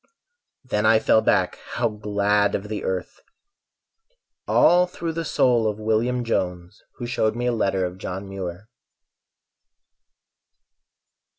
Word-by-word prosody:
Then 105 -5 -1
I 110 +1 +5
fell 110 - +3
back, - - +1 0.2
how - - +1
glad 105 -1 +1
of 105 +1 -5
the 110 - -4
earth! 95 -1 -4 1.3
All 180 +1 +5
through 170 -2 -5
the 165 +1 -3
soul 120 -7 +2
of 105 -1 -2
William 110 +3 0
Jones 90 -4 -3
Who 120 - -6
showed 110 -2 0
me 120 +1 -2
a 125 - +2
letter 95 -4 0
of 90 +1 -6
John 95 +1 -5
Muir. 95 0 -6
105 Hz, 125 wpm, -23 LUFS, 95-120 Hz, 1.3 s, I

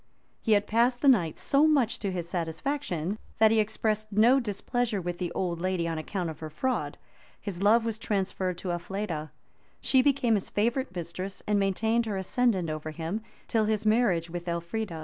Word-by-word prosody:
He 220 - +3
had 205 0 +3
passed 240 +4 +2
a - - +4
night 185 - +4
so 285 +3 +3
much 275 -7 +2
to 200 -3 -2
his 175 -2 -3
satisfaction, 180 - -2 0.2
that 220 0 +6
he 225 - +4
expressed 215 0 -1
no 230 +6 +5
displeasure 230 0 -1
with 175 -1 -4
the 175 -2 -2
old 175 -3 -2
lady 185 -2 0
on 165 -1 -2
account 170 +1 -3
of 155 - -11
her 155 - -6
fraud; 255 - -2 0.4
his 195 -4 -5
love 225 +3 +5
was 225 -1 -2
transferred 190 -4 -1
to 180 0 -3
Elfleda; 175 -3 -3 0.5
she 260 - +4
became 255 -4 +2
his 200 -3 0
favorite 235 +1 0
mistress, 180 +3 -5
and 210 -1 +2
maintained 220 +4 +1
her 205 -2 -2
ascendant 190 -1 +1
over 155 0 -4
him, 165 +7 -4 0.3
till 220 -2 +2
his 215 0 0
marriage 215 -7 +3
with 175 +1 -6
Elfrida. 170 +2 -3
200 Hz, 185 wpm, -28 LUFS, 175-225 Hz, 0.5 s, that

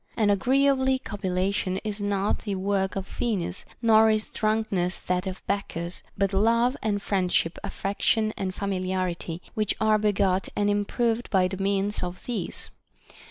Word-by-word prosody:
And 210 -2 +4
agreeably 265 +5 +3
copulation 190 -3 -1
is 210 -1 -3
not 205 0 0
the 205 -3 -3
work 190 0 0
of 195 -1 -3
Venus, 200 -6 -2 0.2
nor 220 -1 +6
is 215 0 0
drunkenness 215 -5 0
that 180 +1 -2
of 185 0 -6
Bacchus; 180 -3 -3 0.2
but 195 0 +1
love 230 +5 +3
and 210 -2 0
friendship, 180 -4 0
affection 215 +2 0
and 185 -1 -3
familiarity, 185 -3 -2
which 215 -3 0
are 215 -1 +3
begot 195 -2 +1
and 205 0 +2
improved 225 +3 0
by 185 -3 +3
the 190 +1 -5
means 200 +1 0
of 180 0 -5
these. 240 -3 -4
200 Hz, 145 wpm, -26 LUFS, 185-215 Hz, 0.2 s, nor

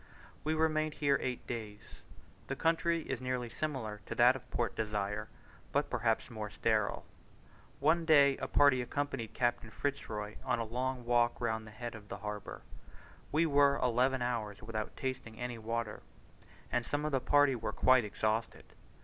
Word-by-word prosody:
We 155 +1 0
remained 155 -1 +1
here 140 -2 +2
eight 125 -1 -3
days. 110 -3 -7 0.5
The - - -2
country 165 0 +1
is 130 -4 -4
nearly 125 -2 -2
similar 115 -8 -4
to - - -4
that 125 +2 +6
of 135 - -10
Port 120 -2 -1
Desire, 105 -1 -2 0.4
but - - 0
perhaps - - +1
rather - - -13
more - - -4
sterile. - - 0 0.7
One 160 +4 +3
day 140 -4 +6
a 130 - -3
party 140 -3 +5
accompanied 135 -2 -3
Captain 120 -2 0
Fitz 140 +5 -3
Roy 105 -1 -5
on - - +1
a 115 - -1
long 125 +2 -3
walk 120 0 +2
round 110 -2 -1
the - - -9
head 120 +3 -6
of 105 -1 -11
the - - -5
harbour. 105 0 -6 0.7
We 160 +3 +3
were 140 -2 +4
eleven 125 +1 +2
hours 110 -4 -3
without 110 -1 -4
tasting 130 -4 -4
any 120 -1 -4
water, 115 -1 -3 0.7
and 120 - +1
some 145 +4 -2
of 155 - -1
the 135 - +2
party 145 0 +4
were 120 - -3
quite 130 -2 +5
exhausted. 110 +2 -2
125 Hz, 170 wpm, -33 LUFS, 110-140 Hz, 0.7 s, that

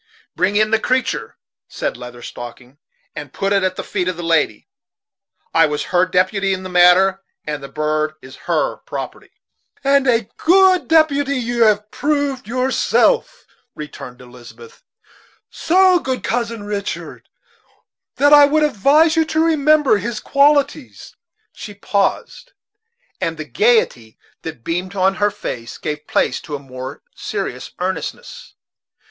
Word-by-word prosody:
"Bring 185 +4 0
in 215 +1 +2
the 225 - +3
creatur'," 255 +3 -2 0.3
said - - -4
Leather 120 0 -10
Stocking, 120 +3 -10 0.4
"and - - -8
put 195 +1 -1
it 200 - +2
at 185 -1 -1
the - - -5
feet 185 -3 -3
of 185 -2 -2
the 175 - -6
lady. 160 -10 0 0.9
I - - +5
was 150 0 -3
her 180 +1 +3
deputy 190 +1 +1
in 185 - -9
the 185 - -7
matter, 180 +2 +4 0.2
and 150 -1 -4
the 140 - -8
bird 155 +1 -1
is 130 -1 -13
her - - 0
property." - - -8 0.5
"And 275 0 +3
a 230 -4 +2
good 370 +1 +4
deputy 285 -3 +2
you 240 -1 +1
have 210 0 +1
proved 285 -4 -1
yourself," 260 - +1 0.3
returned 140 -4 -9
Elizabeth 125 - -14 0.7
"so 365 +2 +3
good, 260 -5 -4
Cousin 230 -2 -2
Richard, 205 -1 -6 0.9
that 290 +1 +4
I 290 -1 +9
would 305 +2 +2
advise 300 - +3
you 325 - +3
to 315 +1 +1
remember 305 -5 +3
his 225 +2 -4
qualities." 285 -1 +1 0.4
She 205 -2 -10
paused, 200 - -2 0.7
and - - -2
the - - -6
gayety 420 - +1 0.2
that 155 -8 -8
beamed 180 +5 -3
on 190 0 +2
her 205 - +4
face 115 - -7
gave 150 0 -5
place - - 0
to 150 - -6
a - - -6
more 130 -1 -9
serious - - -5
earnestness. 485 - -5
205 Hz, 140 wpm, -18 LUFS, -, 0.9 s, I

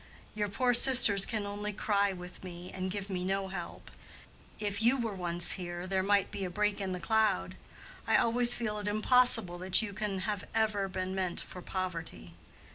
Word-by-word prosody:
Your 210 -1 -2
poor 245 +4 +1
sisters 235 -6 +7
can 215 -3 -3
only 205 +1 -5
cry 200 -1 0
with 180 -1 -10
me 175 0 -9
and 185 0 -4
give 200 +1 -5
me 185 -2 -4
no 195 +1 -2
help. 175 -3 -8 0.7
If 205 0 -2
you 240 +4 +4
were 225 -3 -3
once 175 -2 -2
here, 175 -1 -5
there 190 0 -1
might 200 +1 +1
be 195 - -5
a 185 - -3
break 210 +2 -1
in 190 -1 -3
the 180 - -4
cloud—I 195 - -2
always 240 +1 +4
feel 210 -3 -3
it 205 - -5
impossible 215 -4 +3
that 185 +4 +4
you 205 -3 -6
can 195 -1 -4
have 205 0 -3 0.5
been 185 0 -4
meant 185 -2 -2
for 180 - -10
poverty. 180 -3 -6
195 Hz, 180 wpm, -30 LUFS, 185-210 Hz, 0.7 s, sisters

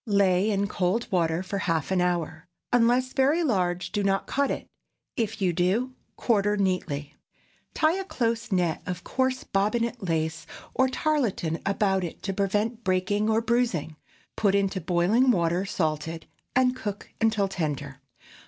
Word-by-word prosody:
Lay 200 -1 +3
in 200 -1 +1
cold 200 +3 0
water 170 -1 +1
for 200 +1 -3
half 165 -2 -1
an 185 -1 +2
hour. 175 -1 -1 0.3
Unless 245 +2 +3
very 290 +6 +3
large, 180 - 0
do 205 - 0
not 195 -1 +1
cut 280 0 0
it; - - -3 0.5
if 220 -2 -2
you 180 -2 +2
do, 195 +9 +1 0.2
quarter 205 -3 +1
neatly. 180 -7 -1 0.6
Tie 320 +4 +2
a - - -2
close 230 - -2
net 175 -4 +1
of 180 -1 -4
coarse 260 +3 0
bobbinet 230 +5 0
lace 160 -3 -2 0.3
or 260 0 +3
tarlatan 245 - 0
about 195 -1 +1
it 170 - -6
to 195 - -2
prevent 210 +4 -1
breaking 195 +3 +1
or 220 +1 +3
bruising; 230 -10 0 0.4
put 200 -2 +2
into 195 -1 0
boiling 180 +10 +3
water 175 -3 +2
salted, 160 -1 -2 0.3
and 255 0 +3
cook 205 -5 -6
until 220 -3 +2
tender. 145 -7 -4
195 Hz, 150 wpm, -26 LUFS, 175-230 Hz, 0.6 s, Lay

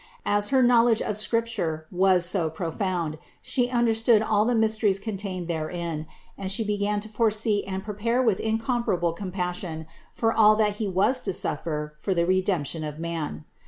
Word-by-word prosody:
As 205 0 +1
her 265 -1 +4
knowledge 240 -2 +4
of 210 - -2
Scripture 215 -8 -1
was 185 -1 +3
so 175 -3 +1
profound, 165 -1 -3 0.2
She 245 -1 +1
understood 230 -2 +3
all 210 -1 +2
the 245 +1 +1
mysteries 220 -3 +2
contained 195 -4 -5
therein 165 -1 -3 0.3
and 190 -1 -2
She 210 +3 +2
began 205 0 -1
to 215 - -7
foresee 215 -1 +1
and 190 0 -4
prepare 220 +4 -1
with 225 -7 +2
in 220 0 0
comparable 225 -8 0
compassion 180 -3 -4 0.3
for 225 -1 0
all 215 -1 +6
that 210 -1 +1
He 215 - -2
was 195 +8 +2
to - - -3
suffer 150 -2 -3
for 190 +2 -1
the 170 0 +2
Redemption 180 -4 0
of 150 -1 -5
Man. 160 - -4
200 Hz, 165 wpm, -25 LUFS, 170-220 Hz, 0.3 s, all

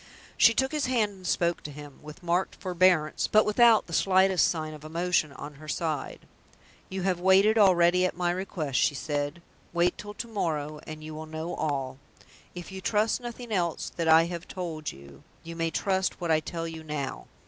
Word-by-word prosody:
She 230 - +6
took 265 +2 +1
his 300 -3 -1
hand 230 -5 +1
and 190 -2 -10
spoke 170 -1 +1
to - - -7
him 145 -1 -11
with 150 +4 -12
marked 175 +2 0
forbearance, 180 -4 +2
but 215 0 +4
without 225 +1 +5
the 170 - -10
slightest 190 0 +4
sign 155 -2 -3
of 150 -1 -11
emotion 165 -1 0
on 145 +1 -8
her 155 - -11
side. 155 -2 -3 0.7
"You 190 -1 -4
have 185 -2 0
waited 190 +4 +5
already 180 -2 +5
at 175 - -7
my 175 -1 +1
request," 170 - -2
she 145 - +2
said. 145 +3 -3 0.3
"Wait 175 +1 +1
till 205 0 -8
to 235 - -5
morrow, 155 -8 -3
and 155 0 -8
you 155 0 -7
will 155 +1 -7
know 160 +2 -5
all. 135 -3 -3 0.6
If 175 0 -8
you 190 0 -7
trust 215 +5 +1
nothing 240 -1 -8
else 175 -5 -1
that 165 -1 -2
I 160 +1 +7
have 170 0 -6
told 165 -5 -5
you, 70 0 -14 0.2
you 165 0 -8
may 165 0 -1
trust 190 +2 -1
what 170 -2 -1
I 155 - +4
tell 165 +1 -5
you 160 -1 -8
now. 150 -3 -5
170 Hz, 195 wpm, -27 LUFS, 155-190 Hz, 0.7 s, I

